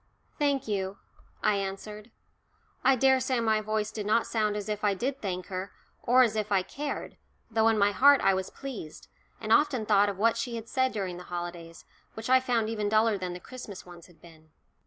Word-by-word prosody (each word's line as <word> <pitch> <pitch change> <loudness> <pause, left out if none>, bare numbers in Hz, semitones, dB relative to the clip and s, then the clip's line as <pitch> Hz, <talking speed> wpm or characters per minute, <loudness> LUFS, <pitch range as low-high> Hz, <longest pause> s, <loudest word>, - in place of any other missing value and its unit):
"Thank 280 -4 +1
you," 195 -2 -2 0.5
I 205 - +3
answered. 205 +3 -6 0.7
I 265 +1 +5
daresay 260 0 +2
my 220 -2 +2
voice 215 0 -2
did 210 -2 -5
not 220 +2 +3
sound 215 -2 0
as 205 - -5
if 210 -1 -3
I 205 -2 +2
did 265 +7 -3
thank 185 -3 -3
her 185 0 -5 0.3
or 255 +2 +5
as 225 -3 +1
if 215 -1 -2
I 195 -2 +3
cared, 285 +8 -5 0.3
though 225 0 +3
in 225 -1 +3
my 200 0 +4
heart 280 +8 +6
I 195 - +3
was 190 0 -2
pleased, 250 - -9 0.3
and 220 +1 +1
often 255 -3 +3
thought 205 -1 +4
of 200 - -5
what 230 +3 +2
she 235 0 -3
had 225 0 -6
said 260 +1 +1
during 190 -4 -4
the 180 - -10
holidays, 175 -1 -7 0.3
which 225 +3 -4
I 260 - +7
found 240 -4 0
even 210 -2 -2
duller 220 0 +3
than 180 -1 -4
the 180 - -7
Christmas 220 -2 -10
ones 175 -1 -13
had 175 -3 -22
been. 160 -1 -17
215 Hz, 205 wpm, -28 LUFS, 195-235 Hz, 0.7 s, I